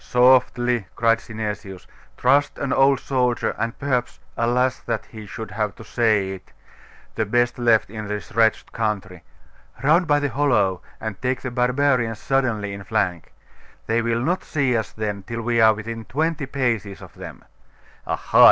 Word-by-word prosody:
'Softly!' 125 -3 +3
cried 115 0 +3
Synesius. 105 -4 -6 0.3
'Trust 145 +1 +3
an 140 - -1
old 135 -1 +4
soldier, 125 -3 0
and 115 +1 -2
perhaps 130 -3 -1 0.2
alas! 125 +2 +1
that 115 -3 -3
he 110 -2 -11
should 105 +1 -7
have 105 -1 -2
to - - -11
say 110 -5 +1
it 95 -1 -10 0.6
the 110 - 0
best 120 +3 +1
left 115 -2 +3
in 110 -1 -6
this 105 +2 -5
wretched 110 0 +2
country. 100 -5 -3 0.6
Round 165 +5 +4
by 145 -1 +4
the 145 -1 -1
hollow, 120 -11 +1 0.2
and 110 -3 -6
take 130 0 -1
the 130 - -4
barbarians 125 -2 +1
suddenly 115 -6 0
in 100 0 -7
flank. 95 -5 -1 0.5
They 115 +1 +1
will 115 0 0
not 175 +8 0
see 135 -5 0
us 110 -1 -1
then 105 -2 -3
till 115 +4 -5
we 120 0 +2
are 110 -1 +6
within 115 +1 -6
twenty 150 +4 -1
paces 115 -8 -2
of - - -13
them. - - -10 0.6
Aha! - - 0
115 Hz, 160 wpm, -22 LUFS, 105-130 Hz, 0.6 s, are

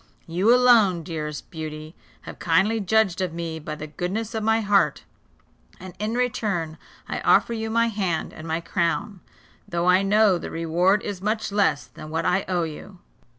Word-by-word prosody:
You, 185 +6 +2
alone, 230 -8 +5
dearest 150 -3 -6
Beauty, 155 -1 -7 0.3
have - - -10
kindly 190 +7 +2
judged 200 -2 +1
of 180 -3 -2
me 165 -1 -4
by 150 0 -6
the 150 - -7
goodness 190 +9 -4
of 220 - -2
my 220 +1 +2
heart; 205 -1 +2 0.8
and 185 -1 -9
in 215 +2 -2
return 200 -10 -1 0.3
I - - -3
offer 235 - +3
you 220 -1 -3
my 230 +1 +2
hand 195 -7 -2
and 155 - -9
my 160 +1 -1
crown, 180 +3 -1 0.5
though 170 0 -1
I 180 +1 +5
know 200 -2 +3
the - - -6
reward 175 +5 +1
is 200 -3 -5
much 215 +1 -1
less 195 -8 +1
than 155 - -11
what 160 +1 -2
I 190 +2 +1
owe 180 -2 0
you." 165 +5 -8
185 Hz, 175 wpm, -24 LUFS, 165-215 Hz, 0.8 s, alone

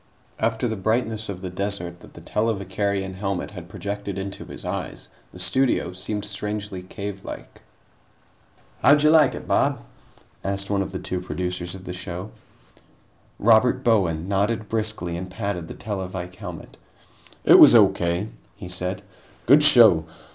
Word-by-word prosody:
After 115 +2 0
the 110 - -2
brightness 110 +1 -1
of 95 -2 -5
the 90 - -4
desert 90 -3 -4
that - - -16
the - - -11
televicarion 100 -2 -1
helmet 95 0 -3
had 90 -4 -10
projected 100 -1 -5
into 95 0 -5
his - - -8
eyes, - - -5 0.2
the - - -12
studio 95 0 0
seemed 105 +3 -3
strangely 105 -1 -4
cavelike. 100 +1 -8 1.2
"How'd 145 +1 +6
you 150 - +6
like 155 -4 +5
it, - - -8
Bob?" - - +1 0.6
asked 100 +1 -2
one 100 -1 +1
of 95 - -4
the 95 - -4
two 90 -1 -4
producers 90 0 -4
of 95 - -11
the 90 - -6
show. 90 +2 -6 1.1
Robert 120 +4 +4
Bowen 90 -8 +2
nodded 105 +3 0
briskly 110 -6 -2
and 90 +2 -5
patted 95 -3 -4
the - - -8
televike 95 -3 -5
helmet. - - -9 0.7
"It - - +8
was - - +9
O.K.," 95 -2 +3 0.3
he 90 -5 -9
said. 90 +2 -3 0.4
"Good 140 +6 +6
show. 110 - +7
100 Hz, 145 wpm, -23 LUFS, 90-110 Hz, 1.2 s, was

